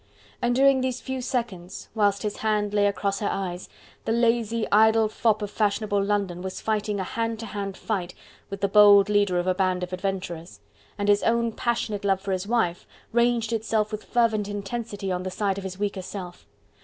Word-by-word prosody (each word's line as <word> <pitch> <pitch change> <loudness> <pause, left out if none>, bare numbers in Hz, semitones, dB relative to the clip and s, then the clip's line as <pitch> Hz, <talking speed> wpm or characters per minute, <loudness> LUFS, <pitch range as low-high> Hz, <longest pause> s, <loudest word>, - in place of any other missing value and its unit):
And 240 0 +1
during 270 0 +5
these 255 -1 -1
few 265 -1 -4
seconds, 205 -8 -4
whilst 205 -2 +1
his 210 -1 -3
hand 210 -1 0
lay 205 -1 +3
across 200 0 -1
her 205 - -1
eyes, 180 -2 -4 0.4
the - - 0
lazy, 230 -1 +1
idle 220 +1 +5
fop 215 0 +1
of 205 - -4
fashionable 205 -1 0
London 200 -3 -1
was 190 0 -5
fighting 210 -2 -1
a - - -1
hand 225 +3 -3
to - - -5
hand 200 -2 -5
fight 185 -5 -3 0.3
with 195 0 -6
the 200 - +3
bold 205 0 +7
leader 205 -3 +2
of 175 - 0
a 185 - +2
band 185 -1 0
of 180 0 -5
adventurers: 185 -3 -4 0.4
and 205 -1 -2
his 205 0 +4
own 235 0 +1
passionate 220 -3 -2
love 195 -1 +2
for 195 0 -4
his 185 +1 -2
wife 210 -7 0 0.2
ranged 235 -1 +2
itself 220 -1 0
with 215 0 -5
fervent 220 -4 +1
intensity 205 -1 -4
on 180 0 -1
the 185 - -4
side 200 0 -1
of - - -8
his 185 -1 -6
weaker 200 -1 -2
self. 180 -1 -8
205 Hz, 195 wpm, -25 LUFS, 195-225 Hz, 0.4 s, bold